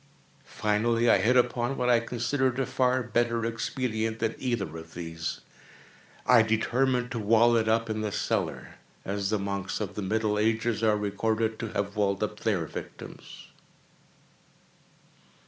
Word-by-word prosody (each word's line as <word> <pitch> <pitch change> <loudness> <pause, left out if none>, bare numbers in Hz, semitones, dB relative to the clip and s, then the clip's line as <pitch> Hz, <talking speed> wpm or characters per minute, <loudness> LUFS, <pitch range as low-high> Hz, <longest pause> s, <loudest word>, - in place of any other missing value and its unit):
Finally 115 +3 +1
I 100 - +6
hit 120 +6 +3
upon 120 +1 +1
what 125 - 0
I 120 -1 +5
considered 125 +2 -1
a 135 - +1
far 130 0 +1
better 115 0 0
expedient 115 -1 -2
than 115 0 -1
either 110 -11 -2
of 80 0 -11
these. 80 -1 -5 0.8
I 125 -1 +7
determined 125 +3 +1
to 120 - -3
wall 115 +3 +4
it 110 -1 +2
up 115 +1 +2
in 110 -1 -2
the 105 -1 -2
cellar—as 100 0 -3
the 110 - +1
monks 100 -1 -3
of 105 - -4
the 105 - -4
middle 105 +1 0
ages 110 0 +1
are 110 -2 +3
recorded 110 +2 -1
to 115 - -3
have 100 +1 -2
walled 100 -1 +1
up 105 0 -4
their 95 -7 0
victims. - - -10
110 Hz, 145 wpm, -28 LUFS, 105-120 Hz, 0.8 s, I